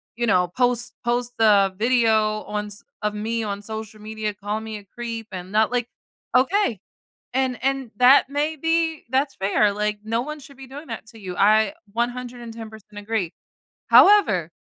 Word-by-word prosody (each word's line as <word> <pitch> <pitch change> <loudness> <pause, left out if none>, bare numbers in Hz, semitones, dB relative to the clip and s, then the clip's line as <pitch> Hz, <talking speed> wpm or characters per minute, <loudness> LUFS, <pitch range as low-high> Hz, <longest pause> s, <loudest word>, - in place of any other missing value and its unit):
you 235 0 -1
know, 180 -3 +3
post 245 -1 +1
post 245 0 0
the 200 -3 +5
video 220 -2 +2
on 210 0 -4
s 205 0 -11 0.2
of 210 -1 -1
me 225 +2 -2
on 200 -1 -4
social 220 0 -7
media 215 0 -4
calling 210 +2 -4
me 220 -1 -5
a 205 - -13
creep 230 -2 -5
and 185 0 -7
not, 220 +2 +2
like" 245 -1 0 0.5
Okay, 270 - +2 0.6
and 260 -2 0
and 270 -3 -1
that 255 +3 +6
may 300 +2 -1
be 325 +1 0
that's 270 +2 +1
fair, 200 +1 +2
like, 210 0 -1
no 225 +2 -1
one 300 +3 -6
should 275 0 -15
be 270 - -10
doing 290 +4 -9
that - - -6
to 225 -1 -14
you. 185 -3 -6
I 215 +7 +4 0.2
110% 230 -3 -5
agree. 205 -4 -2 0.6
However, 210 - +6
225 Hz, 170 wpm, -23 LUFS, 210-250 Hz, 0.6 s, that